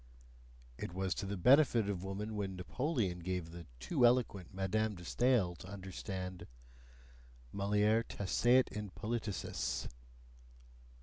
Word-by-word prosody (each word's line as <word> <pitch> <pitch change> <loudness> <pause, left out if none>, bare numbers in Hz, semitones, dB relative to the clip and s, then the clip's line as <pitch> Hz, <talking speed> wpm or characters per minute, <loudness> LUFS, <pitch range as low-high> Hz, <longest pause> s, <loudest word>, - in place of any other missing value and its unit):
It 85 - -5
was 95 0 0
to 100 - -4
the 100 0 -3
benefit 125 - +5
of 95 -3 -2
woman 105 +3 -4
when 100 -2 -3
Napoleon 100 - -1
gave 90 -1 -3
the 85 -1 -9
too 65 - 0
eloquent 120 -7 +3
Madame 105 +3 0
de 90 -1 -10
Stael 120 -5 +2
to 85 - -11
understand: 95 -1 -6 1.1
mulier 105 +3 +3
taceat 120 +5 +2
in 105 -1 -5
politicis! 105 0 -3
100 Hz, 120 wpm, -35 LUFS, 90-110 Hz, 1.1 s, benefit